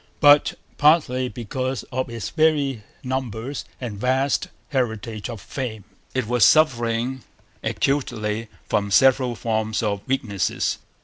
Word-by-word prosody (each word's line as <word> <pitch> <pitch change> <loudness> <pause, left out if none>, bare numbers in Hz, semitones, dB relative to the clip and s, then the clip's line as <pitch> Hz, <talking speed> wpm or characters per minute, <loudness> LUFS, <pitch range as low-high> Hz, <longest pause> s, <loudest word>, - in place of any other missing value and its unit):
But, 145 -1 +6 0.2
partly 145 -5 +4
because 130 +4 -3
of 130 0 -2
its 115 -3 -5
very 150 -6 +2 0.2
numbers 130 0 -3
and 115 -6 -5
vast 130 +4 +1 0.2
heritage 110 -5 -2
of 115 - -6
fame, 110 0 -5 0.3
it 130 -3 +1
was 120 0 +2
suffering 120 -2 +3 0.4
acutely 115 -5 -1 0.2
from 100 -1 0
several 130 +2 +4
forms 110 -1 -1
of 100 -2 -1
weakness. 115 -8 -1
125 Hz, 115 wpm, -23 LUFS, 110-135 Hz, 0.4 s, But